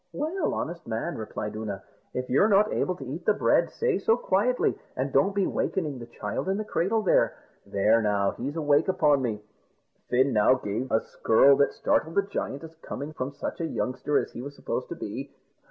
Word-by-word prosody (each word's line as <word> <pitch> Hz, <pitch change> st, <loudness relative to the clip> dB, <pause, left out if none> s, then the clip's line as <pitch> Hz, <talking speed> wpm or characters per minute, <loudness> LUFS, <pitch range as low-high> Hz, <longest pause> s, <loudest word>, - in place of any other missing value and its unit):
"Well, 315 Hz, +4 st, -1 dB
honest 170 Hz, +1 st, -5 dB
man," 110 Hz, 0 st, -3 dB
replied 105 Hz, -1 st, -5 dB
Oonagh, 105 Hz, -3 st, -5 dB, 0.3 s
"if 125 Hz, 0 st, -3 dB
you're 140 Hz, +11 st, +4 dB
not 210 Hz, 0 st, +4 dB
able 185 Hz, -, 0 dB
to 135 Hz, -, -9 dB
eat 150 Hz, +7 st, -6 dB
the 215 Hz, -, +4 dB
bread, -, -, +3 dB
say 465 Hz, -3 st, 0 dB
so 225 Hz, -, +3 dB
quietly, 240 Hz, +3 st, +1 dB, 0.2 s
and -, -, -2 dB
don't 195 Hz, 0 st, +3 dB
be 200 Hz, -2 st, +2 dB
wakening 150 Hz, -8 st, -2 dB
the 120 Hz, -, -9 dB
child 105 Hz, -, -4 dB
in 195 Hz, -, +1 dB
the 215 Hz, -, -3 dB
cradle 215 Hz, +3 st, 0 dB
there. 190 Hz, -, +3 dB, 0.3 s
There, 105 Hz, +3 st, +3 dB
now, 100 Hz, -2 st, +1 dB
he's 140 Hz, +5 st, -5 dB
awake 150 Hz, -1 st, +2 dB
upon 155 Hz, -7 st, +3 dB
me." 110 Hz, -4 st, -3 dB, 0.7 s
Fin 130 Hz, +2 st, +3 dB
now 110 Hz, +4 st, +5 dB
gave 120 Hz, +1 st, -4 dB
a 110 Hz, -, +3 dB
skirl 135 Hz, +5 st, +4 dB
that 140 Hz, -, +3 dB
startled 160 Hz, +1 st, 0 dB
the 200 Hz, -, +4 dB
giant, 165 Hz, -7 st, -4 dB
as 160 Hz, 0 st, -10 dB
coming 145 Hz, +2 st, -6 dB
from 130 Hz, -1 st, -4 dB
such 145 Hz, -, -5 dB
a 165 Hz, -, -1 dB
youngster 140 Hz, +1 st, -1 dB
as -, -, -1 dB
he 120 Hz, -, -7 dB
was 140 Hz, +2 st, -8 dB
supposed -, -, -4 dB
to -, -, -4 dB
be. -, -, -6 dB
145 Hz, 205 wpm, -27 LUFS, 120-190 Hz, 0.7 s, now